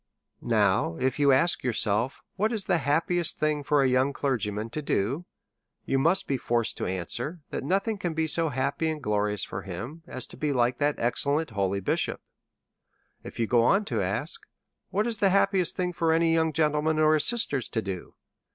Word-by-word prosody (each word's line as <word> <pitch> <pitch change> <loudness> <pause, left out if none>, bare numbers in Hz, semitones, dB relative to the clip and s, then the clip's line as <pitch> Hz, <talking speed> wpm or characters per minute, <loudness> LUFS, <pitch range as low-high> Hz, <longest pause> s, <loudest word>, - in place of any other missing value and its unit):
Now, 100 -7 +1
if 130 +2 0
you 140 -1 +5
ask 150 +7 +3
yourself 115 0 0
what 215 +4 0
is 220 -4 -2
the 175 - +2
happiest 160 +4 +1
thing 155 -1 0
for 145 -1 +2
a - - +3
young 130 +2 +2
clergyman 110 -6 -2
to 155 - -4
do? 140 - -1 0.6
you 135 - +1
must 165 +7 +2
be 135 - 0
forced 120 -1 0
to - - -3
answer, 120 - -4
that - - -3
nothing 195 +7 0
can 175 -3 -3
be 160 0 +1
so 160 +1 +1
happy 140 +4 -1
and 155 -1 -3
glorious 105 -4 -1
for 95 - -5
him 110 - -7
as 130 - -4
to - - -11
be 150 -2 -1
like 120 -1 +1
that 145 0 +1
excellent 140 +5 0
holy 100 -1 -1
bishop. - - -1 1.0
If - - -10
you 115 - +2
go 120 +1 +3
on, 195 - +4
and 210 - -9
ask - - -2 0.5
what 210 - 0
is 230 -3 -2
the 195 - +4
happiest 195 -2 +3
thing 180 -1 -1
for 165 -1 +1
any 165 0 +3
young 160 -1 +2
gentleman 155 0 +1
or 155 0 +4
his 155 -1 +3
sister 230 - +2
to 110 - -2
do? 95 -3 -6
145 Hz, 195 wpm, -27 LUFS, 120-165 Hz, 1.0 s, you